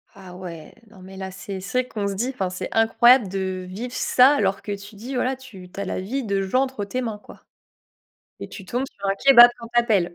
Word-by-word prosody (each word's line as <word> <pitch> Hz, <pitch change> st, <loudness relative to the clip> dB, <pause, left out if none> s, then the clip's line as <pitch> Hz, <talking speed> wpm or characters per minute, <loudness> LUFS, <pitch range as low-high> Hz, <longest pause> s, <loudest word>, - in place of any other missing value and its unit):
Ah 190 Hz, -2 st, -12 dB
ouais, 170 Hz, -4 st, -9 dB, 0.2 s
non, 210 Hz, -3 st, -17 dB
mais 190 Hz, +1 st, -12 dB
là, 190 Hz, 0 st, -6 dB
c'est 190 Hz, +1 st, -7 dB
c'est 250 Hz, +7 st, -1 dB
là 250 Hz, -, -17 dB
qu'on 205 Hz, -2 st, -3 dB
se 200 Hz, -, -2 dB
dit 240 Hz, +7 st, -2 dB, 0.2 s
c'est 185 Hz, -, -5 dB
incroyable 225 Hz, 0 st, +4 dB
de 190 Hz, -1 st, -3 dB
vivre 230 Hz, +7 st, -7 dB
ça 260 Hz, +3 st, +4 dB
alors 195 Hz, -5 st, 0 dB
que 205 Hz, -, -6 dB
tu 200 Hz, +2 st, -13 dB
dis, 240 Hz, +6 st, -7 dB
voilà, 255 Hz, +1 st, 0 dB
tu 225 Hz, -9 st, -13 dB
tu -, -, -9 dB
as 200 Hz, -, -3 dB
la -, -, -3 dB
vie 250 Hz, +9 st, -3 dB
de 200 Hz, -3 st, -1 dB
gens 255 Hz, +8 st, +1 dB
entre 260 Hz, -6 st, -4 dB
tes 255 Hz, +6 st, -3 dB
mains, 220 Hz, -4 st, -4 dB
quoi -, -, -15 dB, 1.0 s
et -, -, -7 dB
tu 195 Hz, -, -10 dB
tombes 245 Hz, +8 st, -2 dB
sur 200 Hz, -, -15 dB
un 195 Hz, -, +2 dB
kebab, 240 Hz, 0 st, +8 dB
on 230 Hz, -, -8 dB
t'appelle. 220 Hz, -7 st, +1 dB
205 Hz, 235 wpm, -23 LUFS, 190-245 Hz, 1.0 s, kebab